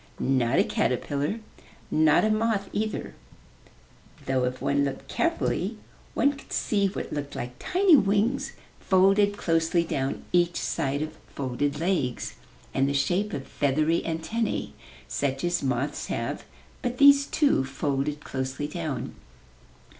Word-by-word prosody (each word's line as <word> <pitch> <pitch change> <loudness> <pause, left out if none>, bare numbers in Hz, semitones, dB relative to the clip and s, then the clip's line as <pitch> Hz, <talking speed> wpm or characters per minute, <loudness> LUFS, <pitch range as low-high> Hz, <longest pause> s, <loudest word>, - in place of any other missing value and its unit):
Not 130 -1 +2
a - - +6
caterpillar, 145 - -1 0.5
not 155 +4 +4
a 215 - +2
moth 215 -2 0
either, 215 0 -2 1.1
though 130 -1 +1
if 125 +1 -3
one 140 0 +1
looked 135 -1 -4
carefully 335 0 -1 0.4
one 280 - +3
could 275 - -14
see 200 -2 +1
what 190 - -5
looked 145 -1 -4
like 125 +1 -5
tiny 370 -2 +4
wings 210 +3 +2 0.3
folded 200 +2 +3
closely 165 -1 +2
down 135 -4 -2
each 175 -1 +3
side 140 +2 -1
of 155 0 -6
folded 140 +2 -2
legs, 165 -8 -1 0.4
and 135 +1 +2
the 140 - -1
shape 190 +8 +1
of 135 -6 -4
feathery 155 +4 +1
antennae 185 +8 -2 0.3
such 135 -1 -2
as 175 0 +1
moths 130 +1 -1
have, - - -3 0.4
but 245 0 -2
these, 280 0 +7
too, 285 - +2
folded 140 +2 -2
closely 130 +2 -3
down. 155 -4 -4
160 Hz, 130 wpm, -26 LUFS, 135-205 Hz, 1.1 s, these